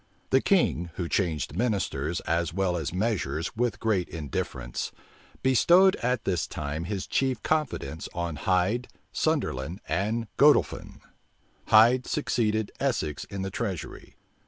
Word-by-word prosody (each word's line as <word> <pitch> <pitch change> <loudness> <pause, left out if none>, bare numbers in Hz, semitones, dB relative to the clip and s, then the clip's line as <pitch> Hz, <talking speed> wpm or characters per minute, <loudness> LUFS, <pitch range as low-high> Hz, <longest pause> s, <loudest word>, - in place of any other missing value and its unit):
The 130 - +5
king, 90 - +2
who 85 - -3
changed 80 -6 -1
ministers 90 - -1
as 85 0 0
well 95 -2 +1
as 80 -5 -2
measures 90 -5 -1
with 115 -3 -1
great 105 -6 0
indifference, 65 -5 -4 0.5
bestowed 175 +9 +5
at 125 -1 -1
this 90 -4 0
time 75 +2 -4
his 100 0 -3
chief 130 -4 0
confidence 125 - -2
on 85 -3 -3
Hyde, 95 - +1 0.2
Sunderland, 65 +9 -1
and 105 +7 -1
Godolphin. 145 +2 +3 0.7
Hyde 120 +4 +6
succeeded 110 -2 0
Essex 115 - -1
in 100 -1 -5
the 95 - -4
treasury. 95 -5 -5
95 Hz, 125 wpm, -27 LUFS, 85-120 Hz, 0.7 s, Hyde